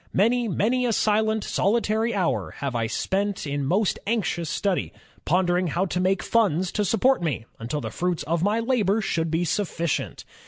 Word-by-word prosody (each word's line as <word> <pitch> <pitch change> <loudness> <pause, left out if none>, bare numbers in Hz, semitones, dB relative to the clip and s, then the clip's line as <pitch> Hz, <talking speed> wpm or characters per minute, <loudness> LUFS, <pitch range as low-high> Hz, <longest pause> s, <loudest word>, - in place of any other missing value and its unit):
Many, 235 +4 +2
many 245 +5 +1
a 230 - +1
silent, 220 0 +1
solitary 220 +2 +1
hour 130 - 0
have 140 -2 -3
I 115 -2 0
spent 195 - -1
in 145 -1 -2
most 190 +9 +1
anxious 180 -7 -1
study, 190 +3 -1 0.3
pondering 180 +1 +2
how 175 +4 0
to 180 -1 -2
make 190 +1 +1
funds 190 -6 +1
to 210 - 0
support 225 +4 +2
me 145 -9 -2
imtil 125 +6 -4
the - - -4
fruits 180 -1 -1
of 165 +2 -1
my 205 +4 +2
labor 225 -4 +1
should 165 -5 -1
be 165 +2 0
suffi 170 0 -2
cient. 165 - -2
190 Hz, 180 wpm, -25 LUFS, 165-220 Hz, 0.3 s, Many